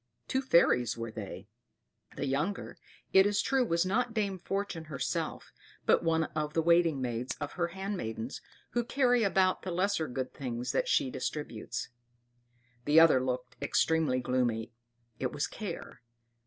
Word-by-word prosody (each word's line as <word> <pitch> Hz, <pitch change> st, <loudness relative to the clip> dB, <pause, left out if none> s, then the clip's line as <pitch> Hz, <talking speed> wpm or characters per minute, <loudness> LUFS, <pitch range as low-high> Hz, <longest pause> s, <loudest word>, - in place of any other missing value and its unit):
Two 265 Hz, -, 0 dB
fairies 125 Hz, -, +3 dB
were 115 Hz, -1 st, -4 dB
they; 105 Hz, -3 st, -7 dB, 0.7 s
the 140 Hz, -, -2 dB
younger, 150 Hz, +9 st, -2 dB, 0.4 s
it 190 Hz, +1 st, +7 dB
is 205 Hz, 0 st, +1 dB
true, 270 Hz, -1 st, +2 dB
was 170 Hz, -6 st, +1 dB
not 235 Hz, +5 st, 0 dB
Dame 200 Hz, -3 st, -1 dB
Fortune 195 Hz, -3 st, -3 dB
herself, 140 Hz, -5 st, -3 dB, 0.3 s
but -, -, +4 dB
one 165 Hz, -1 st, +2 dB
of 150 Hz, -1 st, -2 dB
the 165 Hz, -, +3 dB
waiting 170 Hz, -3 st, +4 dB
maids 120 Hz, 0 st, -2 dB
of 145 Hz, -1 st, -4 dB
her 175 Hz, -2 st, -1 dB
handmaidens 170 Hz, -, -4 dB, 0.3 s
who 240 Hz, -, +1 dB
carry 245 Hz, -1 st, +2 dB
about 190 Hz, -3 st, +2 dB
the 190 Hz, -, -5 dB
lesser 180 Hz, -1 st, 0 dB
good 130 Hz, +1 st, -4 dB
things 125 Hz, -2 st, -3 dB
that -, -, 0 dB
she 285 Hz, -, +2 dB
distributes; 125 Hz, -, -4 dB, 1.0 s
the 150 Hz, +2 st, +6 dB
other 160 Hz, -6 st, +6 dB
looked 125 Hz, 0 st, -3 dB
extremely 155 Hz, -1 st, +2 dB
gloomy 120 Hz, -3 st, 0 dB, 0.5 s
it -, -, -1 dB
was -, -, -1 dB
Care. -, -, -7 dB
160 Hz, 150 wpm, -31 LUFS, 125-195 Hz, 1.0 s, it